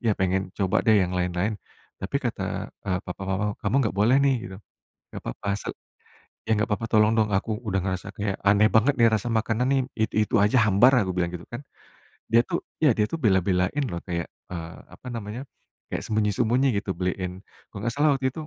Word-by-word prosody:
"Iya, 115 - +2
pengen 95 0 0
coba 95 -2 +1
deh 110 -1 +4
yang 90 0 -2
lain-lain. 90 +3 0 0.5
Tapi - - -2
kata, - - -2 0.4
eee, 95 -2 -1
papa 90 +1 -7
mama 95 +2 0 0.2
kamu 105 +4 -1
nggak 105 - -1
boleh 120 +6 +5
nih." 135 -1 +4
Gitu. 95 - -9 0.5
"Nggak - - -8
apa-apa - - -7
asal - - -5 0.8
ya 110 - 0
nggak 110 +2 +1
apa-apa 115 +2 -3
tolong 110 0 +4
dong, 110 -2 +2
aku 95 - -1 0.2
udah 95 -1 +1
ngerasa 95 0 -3
kayak 100 -2 -1
aneh 105 +2 +5
banget 110 +6 +4
nih 115 -1 +6
rasa 110 +2 0
makanan 115 +2 0
nih 135 -1 +3 0.2
itu-itu 110 0 +1
aja 110 +4 +4
hambar." 110 +6 +5
Aku 95 - -2
bilang 90 -1 0
gitu, 85 - -8
kan. 120 - -5 0.7
Dia 115 +1 +4
tuh 170 -2 -2 0.2
ya, 150 -6 +4
dia 105 -1 0
tuh 165 - -3
bela-belain 95 - +1
loh 85 -2 -5
kayak, 85 -2 -3 0.2
eee, 85 -1 -6 0.2
apa 125 - -11
namanya, 115 0 -5 0.5
kayak - - -4
sembunyi-sembunyi 110 +5 +1
gitu 100 -2 -3
beliin 90 0 -3 0.2
kalau 100 -1 -9
enggak 115 - -1
salah 150 -1 +4
waktu 130 -1 0
itu 155 +3 -8
105 Hz, 200 wpm, -25 LUFS, 95-115 Hz, 0.8 s, nih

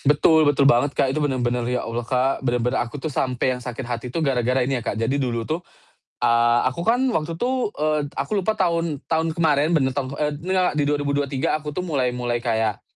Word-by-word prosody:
Betul 150 +2 +4
betul 140 -1 +3
banget. 140 +1 +3
Kak. 130 - +2
Itu 155 - -1
bener-bener 125 -4 0
ya 125 0 -1
Allah, 115 +1 -3
Kak, 130 +2 +1
bener-bener 125 -1 0
aku 120 +4 -4
tuh 145 +1 -5
sampe 130 0 0
yang 125 - -5
sakit 125 +1 -6
hati 120 0 -4
tuh 160 +6 -2
gara-gara 125 -1 +1
ini 130 -2 -1
ya, - - -10
Kak. 115 - -2
Jadi 130 +6 0
dulu 115 -3 -1
tuh, 160 +6 -2 0.6
eee, 120 0 +3
aku 130 +6 -1
kan 230 +7 +2 0.2
waktu 165 +1 -2
tuh, 255 -1 0
eee, 155 0 +1 0.2
aku 205 -2 -1
lupa 215 +3 -1
tahun 170 -5 0
tahun 160 0 0
kemarin 155 -2 +2
bener 130 -2 +1
taun 135 -2 -2
eee, 150 -1 0
nggak, 180 +4 0
di 150 - +1
2023 145 -2 0
aku 150 -1 -6
tuh 180 +5 -4
mulai 135 -7 0
mulai 120 -1 -2
kayak, 110 -3 -1
135 Hz, 215 wpm, -22 LUFS, 125-155 Hz, 0.6 s, Betul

